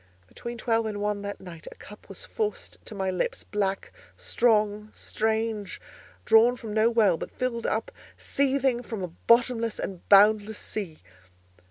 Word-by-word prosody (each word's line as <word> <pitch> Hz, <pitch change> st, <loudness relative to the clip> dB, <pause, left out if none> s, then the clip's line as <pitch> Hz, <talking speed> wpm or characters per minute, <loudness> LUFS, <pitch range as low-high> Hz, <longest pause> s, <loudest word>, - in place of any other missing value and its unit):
Between 235 Hz, -, -8 dB
twelve 225 Hz, -1 st, 0 dB
and 210 Hz, -1 st, -4 dB
one 205 Hz, 0 st, -1 dB
that 200 Hz, 0 st, -6 dB
night 170 Hz, -3 st, -11 dB
a -, -, -12 dB
cup 210 Hz, -, -14 dB
was -, -, -9 dB
forced 430 Hz, -2 st, -4 dB
to 215 Hz, -, -7 dB
my 190 Hz, -1 st, -1 dB
lips, 180 Hz, -, -2 dB
black, 195 Hz, -2 st, -3 dB, 0.2 s
strong, 215 Hz, -2 st, +1 dB
strange, 220 Hz, -2 st, -2 dB, 0.5 s
drawn 230 Hz, +2 st, +5 dB
from 225 Hz, -3 st, -7 dB
no 220 Hz, +1 st, +3 dB
well, 215 Hz, -7 st, +3 dB
but -, -, -6 dB
filled 240 Hz, -2 st, -3 dB
up 220 Hz, +1 st, -2 dB, 0.3 s
seething 270 Hz, -3 st, 0 dB
from 225 Hz, -5 st, -6 dB
a 180 Hz, -, -4 dB, 0.2 s
bottomless 235 Hz, -1 st, +3 dB
and 185 Hz, -3 st, -7 dB
boundless 210 Hz, +1 st, +5 dB
sea. 180 Hz, -, -6 dB
215 Hz, 155 wpm, -26 LUFS, 205-235 Hz, 0.5 s, drawn